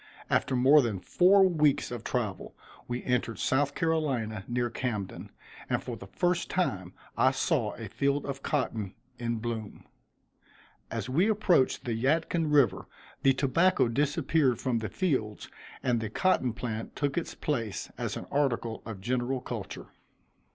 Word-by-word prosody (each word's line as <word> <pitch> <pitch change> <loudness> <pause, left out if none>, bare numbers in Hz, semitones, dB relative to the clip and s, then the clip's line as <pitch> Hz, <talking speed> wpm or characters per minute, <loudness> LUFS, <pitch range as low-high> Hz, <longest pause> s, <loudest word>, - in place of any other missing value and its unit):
After 130 - +2
more 135 +4 +6
than 110 -7 -2
four 190 - +5
weeks 150 -8 +2
of 120 -2 -5
travel 110 -7 -3 0.3
we 120 0 -3
entered 125 -2 0
South 140 +2 +1
Carolina 135 -11 0
near 120 -1 -1
Camden, 110 -6 -4 0.4
and - - 0
for - - -5
the - - -10
first 175 -1 0
time 95 - -1 0.2
I - - +5
saw - - 0
a - - -7
field 140 +1 0
of 140 -1 -5
cotton 110 -10 -2 0.2
in 120 -1 -1
bloom. 110 -2 -5 1.0
As - - -4
we 170 +12 +2
approached 200 -10 +2
the 120 - -1
Yadkin 155 +6 +1
river 125 -10 +3 0.3
the 135 -1 +5
tobacco 150 +4 +3
disappeared 145 0 +1
from 125 -3 0
the 110 -2 -4
fields 110 - -1 0.3
and 120 -2 +2
the 110 - -3
cotton 130 - +1
plant 115 -2 -5
took 140 -1 -1
its 170 - -3
place 115 -9 -3
as - - -3
an - - -7
article 120 -5 0
of 105 -4 -7
general 125 +4 -1
culture. 120 -5 -7
130 Hz, 150 wpm, -29 LUFS, 115-150 Hz, 1.0 s, more